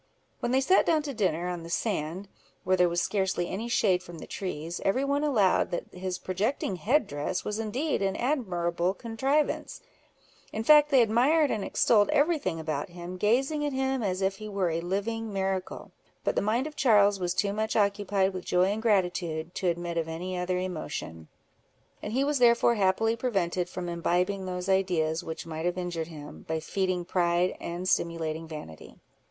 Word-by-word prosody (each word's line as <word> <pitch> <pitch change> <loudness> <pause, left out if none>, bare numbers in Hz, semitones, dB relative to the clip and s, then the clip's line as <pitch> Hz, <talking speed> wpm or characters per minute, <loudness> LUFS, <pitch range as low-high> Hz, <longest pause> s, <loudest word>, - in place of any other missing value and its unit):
When 240 - -1
they 265 +1 +3
sat 370 +8 +4
down 315 -2 +3
to 285 -2 -4
dinner, 180 -6 0
on 175 -1 -3
the 165 - -9
sand, 180 -1 -2 0.4
where 185 +1 +3
there 180 -1 +4
was 170 0 0
scarcely 190 -3 0
any 210 +6 -4
shade 190 -6 +2
from 175 -2 -11
the - - -8
trees, 170 -3 -5
every 255 +8 +1
one 285 +1 0
allowed 220 -11 +3
that 175 - -5
his 185 0 -4
projecting 195 +1 -2
head 255 - +2
dress 145 +5 -3
was 210 +1 -2
indeed 250 +7 -1
an 195 -1 0
admirable 185 - 0
contrivance: 265 +7 -1 0.7
in 220 - -3
fact, 300 +3 +7
they 265 -4 +6
admired 270 +8 +3
and 210 - -1
extolled 210 -3 +3
every 310 +3 +3
thing 175 - -3
about 155 -1 -3
him, 175 +1 -8
gazing 265 +10 +1
at 290 -1 -1
him 265 -1 0
as 190 -2 -1
if 195 0 0
he 215 0 -7
were 195 -4 0
a 165 +1 -1
living 210 +5 -2
miracle; 190 -1 -3 0.3
but - - 0
the - - +2
mind 225 +6 +1
of 305 -1 -7
Charles 205 -7 +4
was 175 -1 -1
too 200 0 +1
much 220 +1 -1
occupied 200 -2 +1
with 185 -1 -5
joy 180 +2 +2
and 215 +2 -2
gratitude, 175 -6 0
to 185 - -2
admit 170 0 -1
of 165 - -2
any 175 +3 -4
other 180 0 -1
emotion; 155 - -5 0.7
and 210 - -5
he 265 +3 +2
was 285 -1 +1
therefore 235 -1 +5
happily 220 +2 +2
prevented 185 -7 -1
from 180 -1 -5
imbibing 180 +3 0
those 180 0 -4
ideas 175 -5 +1
which 160 - -6
might 160 +1 -3
have 175 +1 -1
injured 175 -3 -3
him, 150 -3 -10
by 160 0 -1
feeding 185 +1 -1
pride, 175 0 +1
and 175 +2 -5
stimulating 165 -2 -1
vanity. 150 - -9
190 Hz, 185 wpm, -28 LUFS, 175-225 Hz, 0.7 s, fact